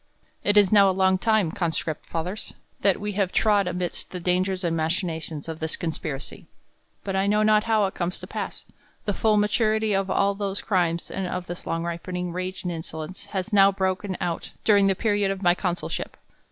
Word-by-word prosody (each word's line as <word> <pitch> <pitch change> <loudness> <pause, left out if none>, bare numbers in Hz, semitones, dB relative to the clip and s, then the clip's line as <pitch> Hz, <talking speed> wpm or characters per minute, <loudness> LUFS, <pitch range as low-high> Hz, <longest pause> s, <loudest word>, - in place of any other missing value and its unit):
TT 205 0 +3
is 200 -3 +6
now 200 -2 +7
a 190 0 -1
long 190 0 +4
time, 220 -6 +2
conscript 160 -3 -2
fathers, 180 +6 -4 0.2
that 195 -2 +2
we 210 0 -3
JL - - -11
have 195 -3 +1
trod 205 -3 +3
amidst 180 -1 -3
the 180 - -5
dangers 185 +2 0
and 170 -1 0
machinations 160 -2 -2
of 160 -1 -5
this 160 0 -1
conspiracy: 155 -4 -4 0.6
but 195 -1 -3
I 195 +1 +2
know 210 +1 +3
not 215 0 +4
how 220 -2 +3
it 190 - -3
comes 175 +1 -2
to - - -8
pass, - - -5 0.4
the 205 - 0
full 215 +1 +2
maturity 215 0 +2
of 195 0 0
all 200 +1 +2
those 200 0 -3
crimes, 170 -4 0
and 190 -1 -2
of 180 0 -3
this 175 0 -7
long 165 0 -1
ripenmg.rage 180 +2 -4
and 180 - -2
insolence, 160 +3 -6
has 200 +1 -4
now 195 -1 +7
broken 190 0 -1
out 170 -1 -3
du 215 - +5
ring 200 -1 +5
the 195 - +2
period 205 -1 +1
of 195 0 -3
my 175 -1 +5
consulship. 180 -1 -3
190 Hz, 200 wpm, -25 LUFS, 175-205 Hz, 0.6 s, now